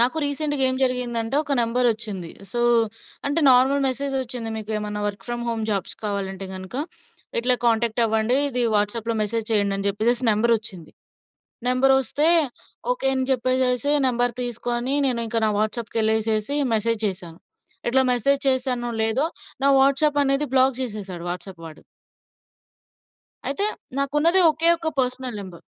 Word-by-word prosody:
నాకు 245 +6 +2
రీసెంట్‌గా 290 -1 0
ఏం 260 - -2
జరిగిందంటే 245 -1 -1
ఒక 285 - -2
నెంబరోచ్చింది. 230 -6 0 0.2
సో, 240 - -1 0.7
అంటే 290 +4 +1
నార్మల్ 265 +3 +3
మెసేజ్ 270 +1 -2
ఒచ్చింది, 235 -2 -4
"మీకెమన్నా 210 -1 -4
వర్క్ 205 0 -6
ఫ్రమ్ 240 0 -4
హోమ్ 225 -1 -2
జాబ్స్ 195 -4 -2
కావాలంటే 195 -2 -4
గనక 185 +4 -9 0.7
ఇట్లా 250 +1 +2
కాంటాక్ట్ 230 0 +1
అవ్వండి 220 +3 +1
ఇది 250 -2 -1
వాట్సాప్లో 215 +2 0
మెసేజ్ 220 +1 -2
చేయండి" 200 -2 +1
అని 195 - -3
జెప్పేసేసి 235 +5 0
నంబరోచ్చింది. 215 -6 -1 0.8
నెంబరొస్తే 265 +3 +3 0.6
ఓకే 385 - 0
అని 260 -1 -1
చెప్పేసేసి 255 +2 +1 0.2
నంబర్ 245 -1 +1
తీసుకొని 240 +2 -1
నేను 240 -3 +1
ఇంక 225 - -4
నా - - +1
వాట్సాప్‌కెళ్ళేసేసి 220 +2 0 0.2
మెసేజ్ 225 0 +1
చేశా. 180 -3 -3 0.6
ఇట్లా 265 +2 +3
మెసేజ్ 275 +3 +2
చేశానో 250 -2 0
లేదో 225 +8 +1 0.4
నా 280 - +5
వాట్సాప్ 285 +2 +3
అనేది 275 +1 +1
బ్లాక్ 260 0 +4
చేసేసాడు 195 -7 -6
వాట్సాప్ 180 0 -7
వాడు. 155 -1 -13 1.7
అయితే 285 +9 +1 0.3
నాకున్నది 295 +6 +3
ఒకే 320 +2 +1
ఒక్క 330 -1 -3
పర్సనల్ 255 -2 -2
నంబర్. 185 -4 -11
240 Hz, 135 wpm, -22 LUFS, 215-265 Hz, 1.7 s, నా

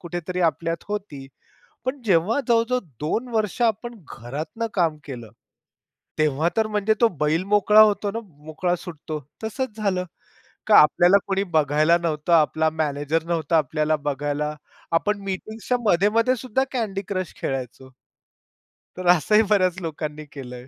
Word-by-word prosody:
कुठेतरी 175 +1 -4
आपल्यात 165 0 -5
होती. 190 -10 -5 0.6
पण 260 +2 -3
जेव्हा 195 +7 +2
जवळ-जवळ 235 +2 +3 0.2
2 225 +12 -2
वर्ष 215 +2 -1
आपण 235 +1 0 0.2
घरातनं 150 - -5
काम 165 -5 +1
केलं, 120 -6 -8 0.9
तेव्हा 155 +1 +2
तर 220 - +2
म्हणजे 210 0 +1
तो 235 - +6
बैल 155 +4 +1
मोकळा 210 +1 +5
होतो 205 -1 +4
ना, 230 +3 -4 0.2
मोकळा 175 +3 -1
सुटतो, 155 -2 -7 0.3
तसंच 235 0 -4
झालं, 195 -4 -1 0.6
का 215 - +6
आपल्याला 175 +5 +6
कुणी 195 0 0
बघायला 155 +2 +3
नव्हतं, 155 0 -1
आपला 160 0 +3
मॅनेजर 155 +1 -1
नव्हता 165 -1 0
आपल्याला 155 +1 0
बघायला, 145 +1 -2 0.4
आपण 205 +5 +1
मीटिंग्सच्या 220 +5 -3
मध्ये-मध्ये 215 +7 +3
सुद्धा 255 +1 -1
Candy 205 -4 -2
Crush 185 -3 -3
खेळायचो. 130 0 -5 1.1
तर 185 -1 -4
असंही 210 +7 +3
बऱ्याच 185 -3 +2
लोकांनी 155 -2 -5
केलंय. 125 -2 -9
175 Hz, 135 wpm, -23 LUFS, 150-210 Hz, 1.1 s, तो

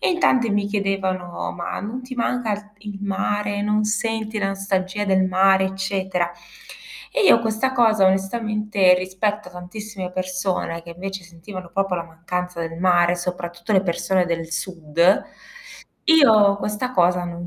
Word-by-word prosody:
E - - +2
in 345 - 0
tante 245 -8 +3
mi 205 0 +1
chiedevano: 195 -3 -2
"Ma 170 -1 -5
non 235 +6 -5
ti 255 +1 -8
manca 215 -4 -2
i 210 0 -11
il 200 - -8
mare? 205 +1 -1
Non 210 0 +1
senti 220 0 -1
la 195 -1 0
nostalgia 195 +1 -2
del 190 -1 +3
mare, 190 +1 +4
eccetera", 190 -2 -1 0.8
e - - 0
io 235 - +6
questa 225 +4 0
cosa 220 -5 +4
onestamente, 205 0 +2
rispetto 190 +2 -2
a - - -17
tantissime 185 +1 -7
persone 185 -2 -2
che 170 - -11
invece 195 +2 -6
sentivano 175 +1 -10
proprio 195 -2 0
la 170 - -3
mancanza 180 +1 -5
del 165 0 -5
mare, 175 -1 +3
soprattutto 175 +1 -4
le 190 - +5
persone 180 0 0
del 165 -1 -3
sud, 170 +1 +1 0.8
io 220 - +6
questa 210 +5 -3
cosa 180 -3 +3
non 175 0 -6
195 Hz, 155 wpm, -22 LUFS, 180-210 Hz, 0.8 s, io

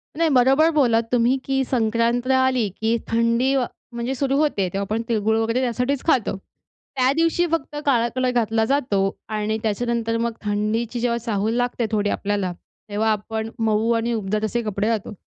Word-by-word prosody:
नाही 330 +1 +2
बरोबर 270 +4 +4
बोलात 240 -7 +3
तुम्ही, 245 +2 +3
की 270 0 +1
संक्रांत 235 0 0
आली, 260 -3 +2
की 225 +1 +2
थंडी, 230 +4 +2 0.4
म्हणजे 235 +2 -3
सुरू 275 +1 0
होते 285 -11 +1
तेव्हा 195 - -1
आपण 215 +3 -2
तिळ-गुळ 220 0 +1
वगैरे, 230 +3 0
त्यासाठीच 250 +3 -1
खातो. 250 -10 +2
त्यादिवशी 295 - -1
फक्त 300 -3 -2
काळा 235 -4 +3
कलर 255 0 +1
घातला 225 -2 +1
जातो. 245 -6 +1 0.3
आणि 215 0 -1
त्याच्यानंतर 230 +1 -1
मग 235 0 0
थंडीची 215 +3 -1
जेव्हा 235 0 0
चाहूल 215 -1 0
लागते 245 -1 0
थोडी 205 -1 +1
आपल्याला, 200 -2 -1 0.4
तेव्हा 220 +2 +1
आपण 220 +1 -3
मऊ 220 +1 +2
आणि 230 +1 0
उबदार 215 -1 -2
तसे 235 +2 -1
कपडे 210 0 -2
घालतो. 220 -2 -2
230 Hz, 160 wpm, -22 LUFS, 220-255 Hz, 0.4 s, बरोबर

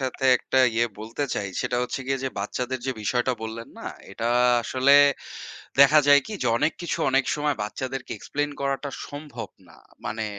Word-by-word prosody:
সাথে 130 0 -3
১ - - -13
টা 130 - +5 0.2
ইয়ে 120 +1 +2
বলতে 115 +6 -3
চাই, 100 -2 -2
সেটা 125 - -1
হচ্ছে 125 - -3
গিয়ে 135 0 0
যে, 135 - 0
বাচ্চাদের 125 +6 -3
যে 130 - 0
বিষয়টা 120 +4 +1
বললেন 115 +1 -6
না? - - -8 0.2
এটা 115 +4 -3 0.3
আসলে 130 +4 +2 0.9
দেখা 140 +2 +8
যায় 145 0 +7
কি? - - -7
যে, - - 0
অনেক 160 - +2
কিছু 170 - -2
অনেক 135 0 +3
সময় 150 -1 0
বাচ্চাদেরকে 130 +5 -5
Explain 145 +1 -2
করাটা 140 +1 -2 0.2
সম্ভব 145 +1 -7 0.2
না। - - -17 0.3
মানে 110 0 -3
130 Hz, 180 wpm, -25 LUFS, 115-140 Hz, 0.9 s, দেখা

